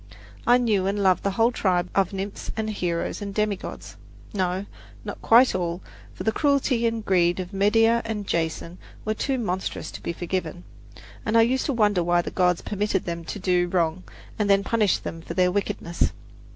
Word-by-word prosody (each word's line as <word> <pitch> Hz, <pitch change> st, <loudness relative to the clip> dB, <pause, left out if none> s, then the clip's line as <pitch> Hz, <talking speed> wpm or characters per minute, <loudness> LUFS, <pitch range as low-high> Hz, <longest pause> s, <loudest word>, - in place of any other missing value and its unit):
I 245 Hz, +1 st, +7 dB
knew 210 Hz, -6 st, +1 dB
and 200 Hz, +1 st, 0 dB
loved 190 Hz, -2 st, +3 dB
the 200 Hz, -, 0 dB
whole 225 Hz, +5 st, +2 dB
tribe 180 Hz, -6 st, +1 dB
of 195 Hz, -2 st, +2 dB
nymphs 195 Hz, +1 st, -5 dB
and 220 Hz, 0 st, -1 dB
heroes 175 Hz, -1 st, -2 dB
and 200 Hz, -1 st, -5 dB
demigods 210 Hz, -3 st, -3 dB, 0.4 s
no, 185 Hz, 0 st, -1 dB, 0.4 s
not -, -, -6 dB
quite 245 Hz, +3 st, +6 dB
all, 175 Hz, -1 st, -2 dB, 0.3 s
for -, -, -6 dB
the 220 Hz, -, +2 dB
cruelty 270 Hz, -3 st, +2 dB
and 225 Hz, -1 st, -3 dB
greed 175 Hz, -1 st, +2 dB
of 180 Hz, 0 st, -5 dB
Medea 225 Hz, +4 st, +3 dB
and 220 Hz, -2 st, -4 dB
Jason 170 Hz, +1 st, -2 dB, 0.3 s
were 215 Hz, -, +1 dB
too 265 Hz, +4 st, -1 dB
monstrous 190 Hz, -6 st, -3 dB
to -, -, -9 dB
be -, -, -3 dB
forgiven, 175 Hz, 0 st, -4 dB, 0.6 s
and 230 Hz, -2 st, +2 dB
I 225 Hz, -, +7 dB
used 255 Hz, +3 st, +1 dB
to 280 Hz, -, 0 dB
wonder 205 Hz, -6 st, +2 dB
why 175 Hz, 0 st, +2 dB
the -, -, -5 dB
gods 180 Hz, -2 st, +1 dB
permitted 205 Hz, -2 st, -1 dB
them 170 Hz, -1 st, -4 dB
to -, -, -5 dB
do 180 Hz, -2 st, +1 dB
wrong 175 Hz, 0 st, 0 dB, 0.4 s
and 205 Hz, -1 st, +1 dB
then 200 Hz, 0 st, +4 dB
punished 215 Hz, -3 st, +1 dB
them 165 Hz, -, -6 dB
for 170 Hz, -, -7 dB
their 180 Hz, 0 st, +3 dB
wickedness. 180 Hz, -3 st, -1 dB
195 Hz, 190 wpm, -25 LUFS, 180-220 Hz, 0.6 s, I